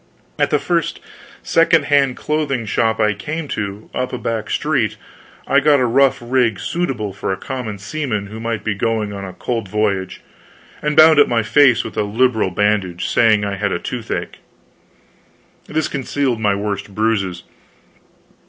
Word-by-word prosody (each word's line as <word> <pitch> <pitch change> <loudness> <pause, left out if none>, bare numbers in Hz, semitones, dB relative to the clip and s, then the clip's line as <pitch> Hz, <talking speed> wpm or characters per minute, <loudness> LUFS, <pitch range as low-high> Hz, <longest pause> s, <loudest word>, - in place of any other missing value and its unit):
At - - +2
the - - +3
first - - -1 0.4
second 165 -2 +3
hand 140 -3 +2
clothing 145 -6 -1
shop 110 +1 0
I 105 -1 +3
came 155 +10 -5
to, 100 0 -4
up 125 0 -2
a 125 - -3
back 110 -2 -3
street, 140 -8 0 0.5
I 140 - +4
got 145 0 +4
a 125 - +2
rough 135 +2 +3
rig 120 -3 +1
suitable 125 - -2
for 95 0 -3
a 95 - -2
common 120 -2 -5
seaman 105 0 -3
who 110 +2 -9
might 115 -1 -3
be 110 - 0
going 110 0 -1
on 100 -1 -6
a 95 - -8
cold 115 +2 -3
voyage, 100 -2 -1 0.6
and 150 0 -1
bound 155 -1 +8
up 145 - +6
my 115 -1 +1
face 125 +1 +4
with - - -8
a - - +2
liberal 110 0 +1
bandage, 95 -2 0
saying 110 -3 +3
I 100 -1 -3
had 100 0 -1
a - - 0
toothache. 115 +5 -5 1.3
This 155 +1 -1
concealed 135 -3 -1
my 105 -2 +2
worst 100 -1 -4
bruises. 100 -6 0
115 Hz, 165 wpm, -19 LUFS, 105-135 Hz, 1.3 s, bound